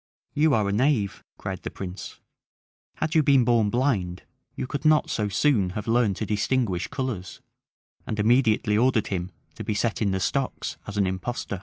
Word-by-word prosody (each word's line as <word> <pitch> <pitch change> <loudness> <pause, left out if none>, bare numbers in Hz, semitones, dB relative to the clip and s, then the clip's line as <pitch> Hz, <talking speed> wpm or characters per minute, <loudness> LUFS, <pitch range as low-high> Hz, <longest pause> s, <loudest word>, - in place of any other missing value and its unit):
"You 150 -2 +3
are 105 -2 +1
a - - 0
knave," 110 -2 +1
cried - - -5
the - - -4
prince; 95 0 -8 0.8
"had 155 0 -2
you 160 - +5
been 140 -3 +4
born 115 -3 +3
blind, 100 -8 0 0.3
you - - -3
could 140 +2 -4
not 155 -1 +4
so 105 -2 -1
soon 100 -3 +2
have 105 - -5
learned 115 -4 +2
to 110 - -3
distinguish 105 -3 0
colors;" 125 -10 -4 0.7
and 110 - -3
immediately 110 -1 +3
ordered 120 -1 +2
him 90 -2 -2 0.2
to - - -7
be 105 - -2
set 115 +2 -1
in 105 - +2
the 95 0 0
stocks 135 +8 -2
as 105 0 -6
an 100 - +3
impostor. 95 +2 -3
110 Hz, 180 wpm, -25 LUFS, 100-130 Hz, 0.8 s, you